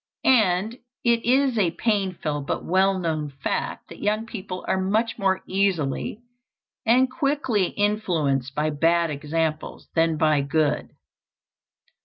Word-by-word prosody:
And 220 Hz, -1 st, +3 dB, 0.2 s
it 235 Hz, -1 st, +2 dB
is 260 Hz, -1 st, +3 dB
a 185 Hz, -4 st, +3 dB
painful 185 Hz, -9 st, -1 dB
but 140 Hz, -, -3 dB
well 190 Hz, +2 st, +3 dB
known 160 Hz, -4 st, -2 dB
fact -, -, -3 dB
that -, -, -11 dB
young 215 Hz, +2 st, 0 dB
people 190 Hz, -5 st, -7 dB
are 190 Hz, -, +1 dB
much 220 Hz, +5 st, 0 dB
more 190 Hz, -1 st, +1 dB
easily 190 Hz, -, -1 dB, 0.6 s
and 255 Hz, +3 st, +5 dB
quickly 260 Hz, -, 0 dB
influenced 160 Hz, -, 0 dB
by 155 Hz, +1 st, 0 dB
bad 165 Hz, +2 st, +2 dB
example 155 Hz, +2 st, -2 dB
than 165 Hz, -1 st, +2 dB
by 155 Hz, -2 st, +3 dB
good. 145 Hz, +1 st, 0 dB
190 Hz, 125 wpm, -24 LUFS, 155-220 Hz, 0.6 s, and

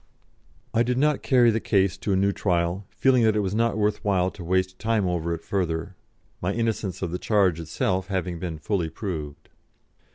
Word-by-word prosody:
I 115 Hz, -, +3 dB
did 125 Hz, +1 st, +1 dB
not 150 Hz, +1 st, +2 dB
carry 120 Hz, -3 st, +4 dB
the 110 Hz, -, 0 dB
case 95 Hz, -4 st, +2 dB
to 105 Hz, -, -3 dB
a -, -, +3 dB
new 100 Hz, +1 st, +2 dB
trial, 90 Hz, 0 st, -1 dB
feeling 130 Hz, -2 st, +3 dB
that 110 Hz, -2 st, +3 dB
it 105 Hz, -, +2 dB
was 95 Hz, -1 st, -2 dB
not 115 Hz, -1 st, +1 dB
worth 105 Hz, 0 st, 0 dB
while 95 Hz, -3 st, +1 dB
to 90 Hz, -, -10 dB
waste 95 Hz, +2 st, 0 dB
time 110 Hz, -3 st, +1 dB
over 85 Hz, -1 st, -1 dB
it 85 Hz, -1 st, -4 dB
further, 90 Hz, -1 st, -2 dB, 0.5 s
my 90 Hz, +3 st, 0 dB
innocence 110 Hz, -5 st, -2 dB
of 85 Hz, -, -2 dB
the 90 Hz, -, -3 dB
charge 95 Hz, -6 st, +2 dB
itself 90 Hz, +3 st, -1 dB
having 90 Hz, -3 st, -2 dB
been 80 Hz, -2 st, -4 dB
fully 85 Hz, 0 st, -1 dB
proved. 80 Hz, -8 st, -6 dB
95 Hz, 195 wpm, -25 LUFS, 90-110 Hz, 0.5 s, carry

